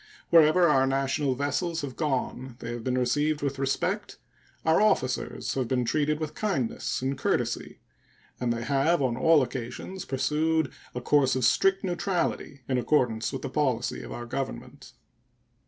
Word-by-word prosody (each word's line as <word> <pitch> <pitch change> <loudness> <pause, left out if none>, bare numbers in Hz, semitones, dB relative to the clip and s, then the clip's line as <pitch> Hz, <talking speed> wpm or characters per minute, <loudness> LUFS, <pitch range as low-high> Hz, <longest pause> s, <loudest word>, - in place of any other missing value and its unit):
Wherever 170 +1 +6
our 135 -3 +4
national 135 0 0
vessels 155 +5 -1
have 140 -3 -6
gone 130 -4 -2
they 120 -2 -6
have 120 -1 -6
been 130 +1 0
received 145 +4 +1
with 140 -1 -2
respect, 135 0 -1 0.5
our 160 +4 +4
officers 130 -12 0
have 130 -3 -1
been 125 -1 0
treated 150 +3 0
with 155 -2 -4
kindness 130 - -2
and 135 +1 0
courtesy, - - -2 0.6
and 125 -1 0
they 115 0 -2
have 140 +6 +2
on 125 -3 +1
all 155 +3 +4
occasions 130 +9 -6
pursued 155 +2 0 0.2
a 125 - -3
course 135 0 +3
of 130 -2 +1
strict 195 +9 +3
neutrality, 175 -5 -2
in 130 -2 +1
accordance 120 -5 +1
with 135 -2 -5
the 135 - -3
policy 130 -6 0
of - - -9
our 120 - -6
Government. 135 +3 -6
135 Hz, 155 wpm, -27 LUFS, 130-155 Hz, 0.6 s, Wherever